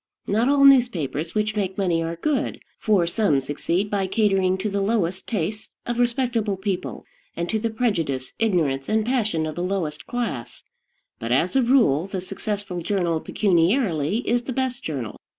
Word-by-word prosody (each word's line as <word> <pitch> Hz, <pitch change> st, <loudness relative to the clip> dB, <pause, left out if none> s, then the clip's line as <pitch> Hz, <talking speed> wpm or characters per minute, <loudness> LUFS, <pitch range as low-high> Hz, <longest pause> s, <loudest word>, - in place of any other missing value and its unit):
Not 225 Hz, +6 st, +2 dB
all 280 Hz, -1 st, +5 dB
newspapers 190 Hz, -, +3 dB
which 215 Hz, 0 st, 0 dB
make 190 Hz, -3 st, -2 dB
money 175 Hz, -4 st, +1 dB
are 165 Hz, +1 st, -3 dB
good, 265 Hz, -, -1 dB, 0.2 s
for 205 Hz, -5 st, +3 dB
some 170 Hz, -5 st, +2 dB
succeed 165 Hz, +8 st, -2 dB
by 195 Hz, -2 st, 0 dB
catering 195 Hz, -3 st, +2 dB
to 190 Hz, -, -2 dB
the 200 Hz, -1 st, -1 dB
lowest 195 Hz, -3 st, 0 dB
tastes 210 Hz, 0 st, -3 dB, 0.2 s
of 240 Hz, 0 st, -2 dB
respectable 235 Hz, -4 st, 0 dB
people, 190 Hz, -1 st, -4 dB, 0.3 s
and 170 Hz, +1 st, -1 dB
to 220 Hz, -, 0 dB
the 230 Hz, +1 st, -1 dB
prejudice, 170 Hz, -, -1 dB
ignorance, 155 Hz, -11 st, +1 dB
and 215 Hz, 0 st, +2 dB
passion 215 Hz, -10 st, 0 dB
of 155 Hz, -, -3 dB
the 175 Hz, -, -4 dB
lowest 175 Hz, -5 st, -3 dB
class; 245 Hz, -1 st, -4 dB, 0.6 s
but, -, -, -4 dB
as -, -, +2 dB
a 265 Hz, -, +5 dB
rule, 230 Hz, -, +3 dB
the 195 Hz, -1 st, -4 dB
successful 195 Hz, -1 st, -4 dB
journal 175 Hz, -3 st, 0 dB
pecuniarily 185 Hz, -, +1 dB
is 240 Hz, 0 st, +1 dB
the 255 Hz, -, -3 dB
best 260 Hz, -1 st, -2 dB
journal. 130 Hz, -8 st, -4 dB
200 Hz, 170 wpm, -23 LUFS, 170-230 Hz, 0.6 s, all